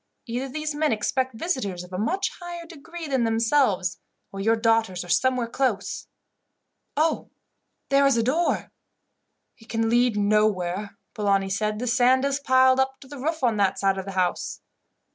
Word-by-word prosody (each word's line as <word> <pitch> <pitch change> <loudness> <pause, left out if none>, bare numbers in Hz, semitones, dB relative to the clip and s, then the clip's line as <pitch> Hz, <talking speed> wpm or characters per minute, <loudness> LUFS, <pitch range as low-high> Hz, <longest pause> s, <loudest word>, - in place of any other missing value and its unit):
Either 250 +3 -3
these 305 +2 -3
men 300 -1 +1
expect 255 +3 -1
visitors 220 - -2
of 180 +1 -13
a - - -2
much 370 - 0
higher 345 -1 -7
degree 335 +1 -9
than 265 -4 +1
themselves, 225 -5 +1 0.3
or 195 - -7
your 225 +3 +3
daughters 225 -5 +1
are - - -13
somewhere 255 +7 +2
close. 230 -6 -2 0.9
"Oh! 315 +1 +1 0.6
there 275 0 +5
is 270 -4 +3
a 230 - +2
door." 315 +8 0 0.9
"It 225 - -19
can 225 0 0
lead 240 -2 +3
nowhere," 205 -2 +1 0.2
Polani 195 -2 +1
said. 210 +2 -1
"The 245 - -3
sand 255 +2 +3
is 280 0 0
piled 260 -1 +4
up 265 0 0
to 270 - -13
the 285 0 -9
roof 315 +2 -2
on 230 -4 +2
that 195 -1 +2
side 195 -1 +1
of 190 - -6
the 195 - -6
house." 185 -1 -1
235 Hz, 170 wpm, -25 LUFS, 205-275 Hz, 0.9 s, there